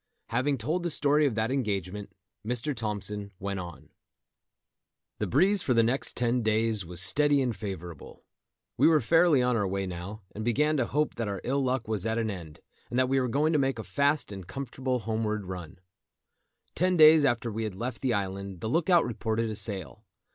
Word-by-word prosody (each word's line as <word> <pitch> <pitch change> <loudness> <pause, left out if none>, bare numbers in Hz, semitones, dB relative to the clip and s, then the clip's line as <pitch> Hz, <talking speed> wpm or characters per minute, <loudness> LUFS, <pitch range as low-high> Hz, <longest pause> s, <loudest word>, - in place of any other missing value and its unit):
Having 130 +5 +1
told 155 +10 -1
the 175 - -2
story 150 -1 +3
of 125 - -2
that 110 +2 0
engagement, 105 -6 -2 0.3
Mr. 125 +6 -2
Thompson 105 -2 -3
went 100 0 -4
on—] 85 -3 -9 1.3
The - - -1
breeze 190 - +3
for 125 - +1
the 115 - +5
next 125 +4 0
ten 120 0 +1
days 110 -1 +1
was 85 0 -6
steady 145 +10 +3
and 125 -4 0
favourable. 90 -7 -8 0.5
We - - +5
were 160 -1 +5
fairly 160 +1 +4
on 125 0 +2
our 100 -3 +1
way 95 +1 -2
now, 95 +4 -7
and 110 - -6
began 150 +7 +2
to - - +1
hope 150 +1 0
that 115 -2 -2
our 100 -1 -3
ill 135 +2 0
luck 130 -1 -1
was 110 -4 -2
at 110 +1 -1
an 110 -2 0
end, 85 -6 -9 0.3
and 120 - -3
that 130 0 +3
we 135 0 +3
were 125 - 0
going 150 +6 +1
to 150 - +3
make 135 -2 0
a 110 - -5
fast 145 -1 0
and 95 -3 -8
comfortable 130 +2 -3
homeward 110 -3 -2
run. 90 -1 -7 1.0
Ten 180 +1 +1
days 155 -1 +8
after 120 -3 +1
we 110 +2 -3
had 105 -4 -4
left 120 +3 -5
the 125 -4 +1
island 100 -2 -4
the 110 - -2
look 165 +6 +1
out 175 -2 +5
reported 110 0 -2
a - - -4
sail. 100 - -4
115 Hz, 200 wpm, -28 LUFS, 100-140 Hz, 1.3 s, days